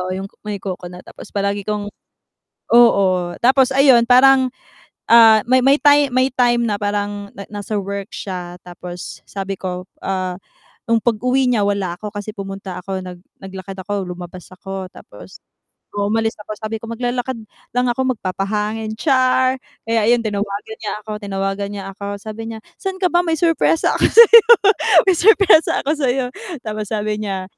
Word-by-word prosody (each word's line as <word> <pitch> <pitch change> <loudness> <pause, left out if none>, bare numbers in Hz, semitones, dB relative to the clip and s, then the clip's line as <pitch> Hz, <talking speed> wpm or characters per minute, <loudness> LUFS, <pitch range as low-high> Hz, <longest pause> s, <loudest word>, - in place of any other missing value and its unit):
Oo 180 - -4
yung 195 +1 -5 0.2
may 210 -1 -4
coconut, 180 -1 -8
tapos - - -12
palagi 200 0 -1
kong 210 0 -3 0.9
oo, 190 -7 +4
tapos 260 +1 +4
ayun, 270 -3 +6
parang, 260 +1 +5 0.6
ah, 225 -1 +7
may 255 +1 +4
may 275 +2 +5
time 290 -1 +4
may 255 +1 +2
time 240 -2 +2
na 210 - 0
parang 205 0 -3
na 200 - -7
nasa 205 0 -4
work 200 0 -5
siya, 180 -2 -7
tapos 175 0 -9
sabi 195 0 -5
ko, 180 -1 -6 0.2
ah, 185 -1 -2 0.5
nung 230 0 +3
pag-uwi 250 +4 0
niya 240 -4 +1
wala 200 -3 -1
ako 210 +3 -7
kasi 205 +1 -7
pumunta 195 -1 -7
ako, 190 0 -4
nag 180 -1 -9 0.2
naglakad 190 0 -9
ako, 200 +1 -3
lumabas 180 0 -9
ako, 190 0 -7
tapos, - - -14 0.5
umalis 220 +2 0
ako 210 0 -7
sabi 220 +1 -5
ko 230 - -9
"Maglalakad 245 +2 -3 0.4
lang 250 - +2
ako, 255 +1 0
magpapahangin." 210 +3 -3
Char! 255 -1 +2 0.2
Kaya 225 -1 +1
ayun, 240 -1 +3
tinawagan 205 +1 -4
niya 215 - -4
ako 220 - -9
tinawagan 195 0 -3
niya 200 -1 -7
ako, 200 +1 -6
sabi 220 +2 -8
niya 220 -1 -8 0.2
"Saan 385 -1 -4
ka 365 -3 0
ba? 345 - +4
May 330 -2 0
surpresa 330 0 +2
ako - - +2
sa 465 - +9
'yo 465 -2 +10 0.6
may 385 - +4
surpresa 375 -2 +5
ako 290 - +1
sa 295 -4 -1
'yo." 250 0 -1 0.3
Tapos, 215 -1 -5
sabi 210 -1 -2
niya 195 -3 -4
210 Hz, 165 wpm, -19 LUFS, 195-250 Hz, 0.9 s, yo